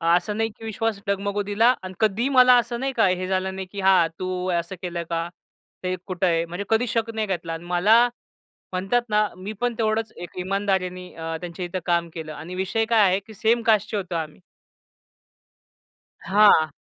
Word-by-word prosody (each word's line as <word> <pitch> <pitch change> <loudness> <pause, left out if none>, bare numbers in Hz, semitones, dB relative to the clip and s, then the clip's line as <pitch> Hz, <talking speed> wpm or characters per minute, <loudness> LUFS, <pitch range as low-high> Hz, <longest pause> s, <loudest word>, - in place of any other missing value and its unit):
असं 205 +4 -1
नाही 225 0 +1
की 225 - -10
विश्वास 220 -1 -2
डगमगू 200 +1 -1
दिला 220 +5 +3
आणि 185 0 -7
कधीही 220 +4 +1
मला 255 -2 +7
असं 235 +1 -3
नाही 270 +1 -1
का, 225 - +3
"हे 185 0 -1
झालं 190 0 -1
नाही 190 -1 -5
की 200 - -6
हां 190 -3 +5
तू 185 0 -2
असं 170 +2 -2
केलं 175 -2 -4
का? 165 0 -1 0.6
ते 185 0 -1
कुठं 185 0 -1
आहे?" 165 -1 +1
म्हणजे 175 +4 -6
कधीच 225 +2 +2
शक 230 -1 0
नाही 220 -1 -2
घेतला. 170 -3 -3
आणि 165 +1 -7
मला 205 +7 +4 0.7
म्हणतात 195 +7 +1
ना 210 0 +3
मी 195 +4 -6
पण 245 0 +1
तेवढंच 220 0 0
एक 175 +1 -9
इमानदारीने 185 -1 -1
अ, 165 0 -4
त्यांच्या 175 +1 -5
इथं 180 +1 -4
काम 170 -1 +1
केलं 160 -2 -6
आणि 170 +4 -8
विषय 190 +4 0
काय 225 -1 +3
आहे 185 +1 +2
की 220 - -11
सेम 225 +3 +2
कास्टचे 210 -1 +2
होतो 185 -3 -4
आम्ही. 155 -2 -4 1.8
हां. 200 -6 +5
190 Hz, 190 wpm, -24 LUFS, 180-220 Hz, 1.8 s, मला